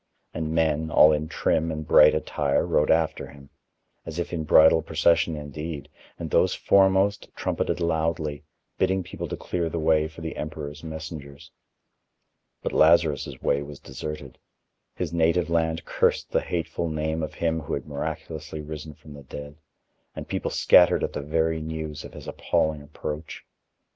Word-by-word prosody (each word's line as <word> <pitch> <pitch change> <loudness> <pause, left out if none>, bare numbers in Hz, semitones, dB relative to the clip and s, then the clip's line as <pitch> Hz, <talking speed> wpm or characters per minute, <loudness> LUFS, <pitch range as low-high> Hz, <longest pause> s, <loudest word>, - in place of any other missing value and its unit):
And 80 -1 -3
men, 80 -1 +1
all 75 0 +7
in 75 +1 -1
trim 80 +1 0
and 75 -1 -5
bright 75 0 +7
attire, 75 - 0
rode 75 - +2
after 80 -1 +1
him, 70 -1 -15 0.5
as 80 0 -7
if 85 0 -3
in 80 -2 -2
bridal 80 +1 +6
procession 80 +1 +2
indeed, 75 +1 -6 0.3
and - - -6
those - - +3
foremost 95 +1 +3
trumpeted - - -1
loudly, 80 -3 -1 0.4
bidding 95 0 +1
people - - -6
to - - -5
clear 85 -2 -2
the 85 - -4
way 80 -1 +2
for 80 +1 -12
the 80 0 -5
emperor's 75 -1 -6
messengers. 80 -3 -8 1.1
But - - -2
Lazarus' 80 -4 +3
way 70 - +2
was 70 0 -9
deserted: 75 +4 -7 0.6
his 85 -3 -3
native 85 0 +2
land 80 0 0
cursed - - +1
the - - +2
hateful 85 0 -3
name 80 +1 -2
of 80 - -5
him 80 -1 0
who 75 0 -3
had 70 - -6
miraculously 75 +2 -5
risen 75 0 -7
from 75 - -14
the 70 - -11
dead, 70 +2 -9 0.6
and - - -7
people - - -2
scattered - - +5
at - - -2
the - - -3
very 80 +2 0
news 80 -1 -5
of - - -11
his - - -10
appalling 80 -1 0
approach. 75 +1 -7
80 Hz, 160 wpm, -25 LUFS, 75-80 Hz, 1.1 s, all